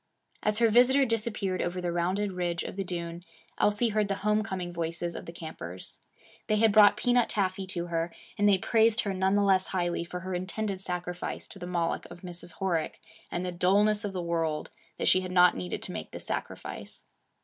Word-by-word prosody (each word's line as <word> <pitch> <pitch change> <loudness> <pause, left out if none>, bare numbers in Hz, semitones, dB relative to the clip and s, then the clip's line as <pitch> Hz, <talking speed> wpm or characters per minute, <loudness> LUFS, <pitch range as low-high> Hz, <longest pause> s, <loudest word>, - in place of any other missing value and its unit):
As 210 0 +4
her 230 0 +4
visitor 250 +4 +5
disappeared 215 -5 -1
over 175 +1 -2
the 175 -1 -2
rounded 185 +4 0
ridge 175 -2 -2
of - - -6
the 195 - -2
dune, 170 -1 -5 0.4
Elsie 210 +3 +3
heard 210 -1 +1
the 195 - -1
home 210 0 +3
coming 185 -3 -4
voices 170 +1 -3
of - - -7
the - - -5
campers. 125 - -8 0.5
They 215 - +2
had 220 0 +4
brought 205 0 +7
peanut 245 +1 +3
taffy 190 -1 -1
to 175 -2 -2
her, 170 0 -2 0.2
and 205 0 +3
they 195 - +5
praised 225 +3 +3
her 200 -3 -2
none 190 +1 +2
the 205 - +3
less 190 -1 +3
highly 175 -2 -1
for 180 +1 -6
her 185 +1 -4
intended 190 +2 -3
sacrifice 180 -1 -4
to 195 - -6
the 175 - -6
Moloch 170 -2 -1
of 175 0 -11
Mrs. 175 -1 -6
Horick 170 -5 -1 0.3
and 175 +1 -3
the 180 - -2
dullness 205 +5 +3
of 205 - -2
the 180 -2 -3
world 165 -2 -1 0.3
that - - -1
she 185 - +5
had 185 -1 -5
not 180 -1 +6
needed 90 -1 -4
to - - -5
make - - -6
this - - -8
sacrifice. - - -5
185 Hz, 205 wpm, -29 LUFS, 175-205 Hz, 0.5 s, brought